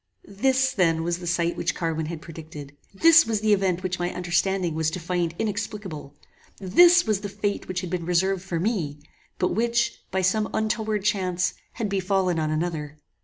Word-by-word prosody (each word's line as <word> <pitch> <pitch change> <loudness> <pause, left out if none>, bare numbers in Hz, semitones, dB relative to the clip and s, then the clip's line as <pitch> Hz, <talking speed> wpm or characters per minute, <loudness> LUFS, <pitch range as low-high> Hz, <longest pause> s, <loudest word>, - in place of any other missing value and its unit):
This 260 +6 +1
then 165 -4 +2
was 170 +1 -1
the 175 - -7
sight 170 0 0
which 170 - -1
Carwin 160 -2 -2
had 160 -1 -6
predicted! 155 -3 -10 0.2
This 325 +10 +6
was 220 -2 0
the 215 -1 +3
event 190 -2 0
which 185 -1 -2
my 175 0 -1
understanding 180 0 0
was 160 0 0
to 165 - -5
find 170 -1 -2
inexplicable! 205 -9 -4 0.4
This 345 - +6
was 215 -3 0
the 205 - -5
fate 205 0 -3
which 185 -1 -3
had 180 - -6
been 175 -2 -3
reserved 185 +2 +1
for 175 -3 -3
me, 170 -8 -1 0.4
but 180 - +1
which, 235 +2 0
by 190 0 -1
some 210 +4 +1
untoward 220 -1 -1
chance, 185 -3 0 0.2
had 230 -4 -2
befallen 190 -3 0
on 155 -1 0
another! 155 -2 -3
185 Hz, 180 wpm, -25 LUFS, 170-210 Hz, 0.4 s, This